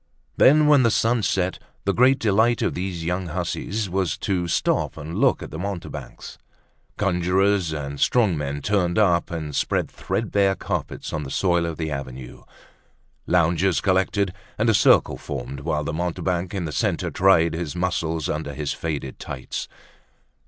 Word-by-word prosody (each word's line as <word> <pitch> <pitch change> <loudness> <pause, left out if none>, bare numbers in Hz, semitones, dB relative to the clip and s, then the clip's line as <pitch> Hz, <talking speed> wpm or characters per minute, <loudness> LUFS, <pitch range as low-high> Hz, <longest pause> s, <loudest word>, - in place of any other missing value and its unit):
Then 150 +3 +6
when 150 -2 +6
the 120 - +4
sun 115 +1 +2
set, 95 -2 0 0.3
the 100 - +2
great 130 +2 +5
delight 110 +1 +2
of - - 0
these 90 -2 -4
young 90 +1 -2
hussies 95 +5 -3
was 90 -4 -1
to 90 -3 -1
stop 85 - 0
and 80 +1 -7
look - - +3
at - - -9
the 80 - -6
mountebanks. 95 -2 -6 0.6
Conjurors 95 -1 +1
and 70 -2 -5
strong 110 -8 +3
men 70 -1 -4
turned 90 -4 +1
up 90 -5 +3
and 80 -4 -5
spread - - 0
threadbare 100 -3 0
carpets - - -4
on 80 - -2
the 70 - -6
soil 85 +1 +1
of 80 - -5
the 80 -2 -3
avenue. 65 -3 -7 0.9
Loungers 85 +1 +2
collected 95 0 +1 0.2
and 115 +1 +3
a - - +1
circle 100 - +4
formed 70 -1 -6
whilst 75 0 -2
the - - -3
mountebank 90 +2 -2
in 90 -3 -2
the 75 - -4
centre - - -1
tried 85 -4 +4
his 80 -1 -4
muscles 85 -3 -1
under 75 -2 -3
his 75 0 -2
faded 75 -5 -4
tights. - - -5
90 Hz, 160 wpm, -23 LUFS, 80-100 Hz, 0.9 s, Then